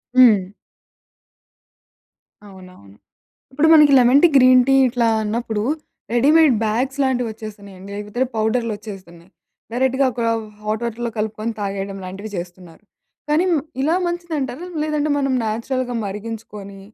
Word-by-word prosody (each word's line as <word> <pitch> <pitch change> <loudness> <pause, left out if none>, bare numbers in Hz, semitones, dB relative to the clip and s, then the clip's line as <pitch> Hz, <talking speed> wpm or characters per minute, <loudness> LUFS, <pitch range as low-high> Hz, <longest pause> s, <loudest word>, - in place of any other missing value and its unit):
హ్మ్. 220 -7 +6 2.0
అవునవును. 185 - -15 0.6
ఇప్పుడు 295 +4 +2
మనకి 300 -2 +7
లెమన్ 250 +3 +5
టీ, - - +9
గ్రీన్ 255 -1 +6
టీ 270 - +4
ఇట్లా 240 -1 0 0.2
అన్నప్పుడు 220 -1 -2 0.5
రెడీమేడ్ 295 +4 +5
బ్యాగ్స్ 250 +5 -1
లాంటివి 250 -2 0
వచ్చేస్తున్నాయండి. 200 -3 -11
లేకపోతే 210 +5 -2
పౌడర్లు 220 +1 0
వచ్చేస్తున్నాయి. 185 -5 -12 0.4
డైరెక్ట్‌గ 260 +2 0
ఒక 235 - -5 0.4
హాట్ 215 +1 -3
వాటర్‌లో 235 +1 -3
కలుపుకొని 215 +1 -3
తాగేయడం 195 -1 -4
లాంటివి 195 +4 -7
చేస్తున్నారు. 175 0 -10 0.5
కానీ 310 +4 +2
మ్ 315 - +2 0.2
ఇలా 310 +5 +2
మంచిదంటారా? 340 -4 -4 0.2
లేదంటే 305 -1 -1
మనం 275 -2 0
నేచురల్‌గ 245 +4 -2
మరిగించుకొని 205 -1 -8
230 Hz, 115 wpm, -20 LUFS, 205-265 Hz, 2.0 s, టీ